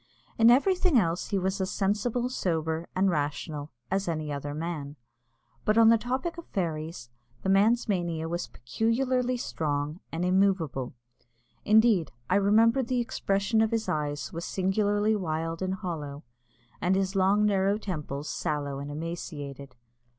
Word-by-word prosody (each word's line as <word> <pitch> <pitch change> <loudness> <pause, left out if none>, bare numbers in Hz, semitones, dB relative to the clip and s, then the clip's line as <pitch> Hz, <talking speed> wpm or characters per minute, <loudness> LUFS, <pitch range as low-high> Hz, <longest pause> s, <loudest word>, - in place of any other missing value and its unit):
In 230 +1 +6
everything 355 +4 +4
else 170 -4 +1
he 200 - 0
was 190 +1 -1
as 185 - -1
sensible, 215 +6 0
sober, 165 -8 -2
and 190 0 +3
rational 150 0 -3 0.2
as 195 0 0
any 155 -3 -2
other 145 +1 -4
man; 155 -3 -4 0.7
but 215 +1 +2
on 225 -1 +7
the 230 - +6
topic 260 +9 -2
of 340 - -11
fairies, 160 - -4 0.3
the 190 - 0
man's 215 +6 +4
mania 170 -5 -1
was 170 +1 -3
peculiarly 250 - 0
strong 150 -6 -2
and 170 +2 -2
immovable. 180 -10 +1 0.7
Indeed, 215 -6 +4 0.2
I - - +5
remember 225 +5 +4
that 245 - -5
the 250 0 0
expression 220 -2 0
of 220 - +3
his 225 -1 -1
eyes 145 -1 -2
was 170 +1 -4
singularly 205 +3 +1
wild 165 -3 -2
and 190 0 -1
hollow, 155 -6 -5 0.6
and 180 +2 +2
his 195 0 0
long 195 +2 +3
narrow 200 0 +2
temples 150 -8 -5
sallow 145 -2 -2
and 140 +1 -6
emaciated. 145 -4 -6
185 Hz, 150 wpm, -28 LUFS, 155-215 Hz, 0.7 s, on